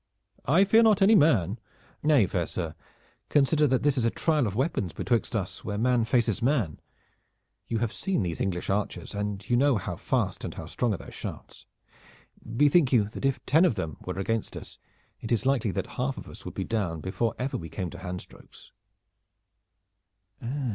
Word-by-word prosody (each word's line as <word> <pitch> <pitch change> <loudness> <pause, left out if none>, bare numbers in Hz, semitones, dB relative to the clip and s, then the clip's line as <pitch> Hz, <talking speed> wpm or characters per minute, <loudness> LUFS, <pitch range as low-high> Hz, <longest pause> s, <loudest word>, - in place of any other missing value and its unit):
"I 165 +9 +5
fear 220 +3 +5
not 215 -3 +5
any 210 +3 +6
man." 120 - +4 0.4
"Nay, 145 -8 +4
fair 85 -2 -1
sir, 80 -4 -4 0.6
consider 150 +1 +3
that 130 -1 +1
this 145 -2 +2
is - - 0
a - - +4
trial 150 -1 +1
of 100 - -4
weapons 115 - -1
betwixt 120 +6 -1
us 95 -4 -3
where 105 -1 -3
man 120 +1 +2
faces 115 -3 +1
man. 120 - +1 0.9
You 115 - -1
have 115 -1 -1
seen 190 - -1
these 85 -3 -3
English 90 -3 -2
archers, 105 +2 -2
and 105 -1 -4
you 120 - +2
know 135 0 +4
how 100 - -4
fast - - -1
and - - -5
how - - -6
strong 120 -2 -1
are - - -6
their - - -11
shafts. - - -8 0.8
Bethink 145 +5 +3
you 120 -5 +5
that 120 - -5
if 135 -2 0
ten 160 +5 +4
of 180 - +3
them 80 -8 -4
were - - -5
against 110 +3 -2
us - - -9 0.4
it 115 - -7
is 120 +2 +1
likely 130 -5 +2
that 95 - -2 0.2
half 130 +1 -1
of - - -8
us - - -12
would - - -7
be - - -2
down 100 -8 -2
before 105 +7 -2
ever 130 +2 -2
we 80 -2 -5
came 85 +2 -4
to 90 - -9
handstrokes." 90 -1 -9
115 Hz, 190 wpm, -27 LUFS, 95-140 Hz, 0.9 s, any